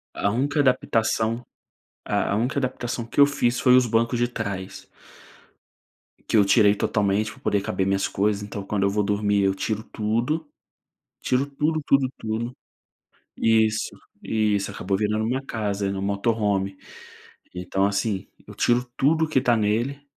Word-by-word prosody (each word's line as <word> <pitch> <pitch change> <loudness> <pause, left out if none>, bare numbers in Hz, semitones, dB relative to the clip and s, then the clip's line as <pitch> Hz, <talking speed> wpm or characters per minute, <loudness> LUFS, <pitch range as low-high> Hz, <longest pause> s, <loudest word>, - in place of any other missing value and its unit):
A 100 - 0
única 140 +7 0
adaptação 115 -3 +1 0.6
a 100 - 0
única 125 +6 0
adaptação 120 -2 -3
que 120 - -10
eu 140 - +9
fiz 125 -4 0
foi 125 - +5
os 125 0 +6
bancos 115 +1 +1
de 120 0 +1
trás. 100 -5 -6 1.4
Que 110 - +2
eu 100 - +5
tirei 105 -1 +5
totalmente 105 +1 0
pra - - -18
poder 100 - +1
caber 95 -1 -1
minhas 95 0 +1
coisas, 105 +1 0
então 100 -1 -6
quando 100 -1 -1
eu 100 - +3
vou 105 +1 0
dormir 100 0 +1
eu 95 0 +2
tiro 110 +2 -2
tudo, 120 +11 -2 0.7
tiro 130 +2 +1
tudo, 150 +3 -1
tudo, 135 -2 +3
tudo. 115 +3 -4 0.8
Isso, 110 -1 +2 0.3
isso, 105 -3 0
acabou 95 +1 -2
virando 105 +1 0
minha 130 +4 -1
casa, 105 -5 -2
meu 95 0 -4
Motorhome, 100 -1 0 0.8
então 90 +2 -1
assim, 100 -1 -1 0.2
eu - - -10
tiro 120 +1 +2
tudo 160 +4 +2
que 145 -4 +1
tá 120 -3 +3
nele. 120 +7 -1
110 Hz, 150 wpm, -24 LUFS, 100-125 Hz, 1.4 s, eu